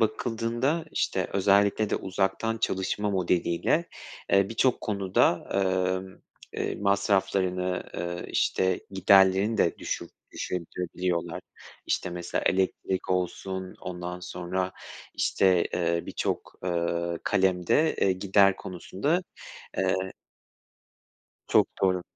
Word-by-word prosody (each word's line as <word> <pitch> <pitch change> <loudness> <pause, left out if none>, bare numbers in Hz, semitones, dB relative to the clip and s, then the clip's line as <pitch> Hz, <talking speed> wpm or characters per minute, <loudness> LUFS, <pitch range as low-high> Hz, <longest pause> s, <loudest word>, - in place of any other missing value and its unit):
bakıldığında, 120 +7 0
işte, - - 0
özellikle 100 +2 +3
de - - +1
uzaktan 95 +4 -1
çalışma 105 0 -1
modeliyle, 90 - +1 0.4
eee, 100 0 +5
birçok 120 +3 +2
konuda, 95 -4 +1 0.5
emm, 95 -1 -13 0.3
eee, - - -2
masraflarını, 95 -2 +1
eee, 85 0 -4
işte, 95 -1 +1
giderlerini 95 +2 +4
de 85 - +2
düşür - - -4 0.2
düşürebiliyorlar, 90 0 -3 0.5
işte, - - -1
mesela 90 0 -3
elektrik 95 0 0
olsun, 95 +1 -2
ondan 90 0 -5
sonra, 90 +1 -3 0.4
işte, 90 -3 +3
eee, 85 -1 0
birçok, - - -3
eee, 85 -1 -1
kalemde, 95 - +2
eee, 95 - +3
gider 100 +1 +4
konusunda, 100 - -2 0.6
eee - - +2 1.5
Çok - - +4
doğru. 95 -2 +3
95 Hz, 95 wpm, -27 LUFS, 90-100 Hz, 1.5 s, eee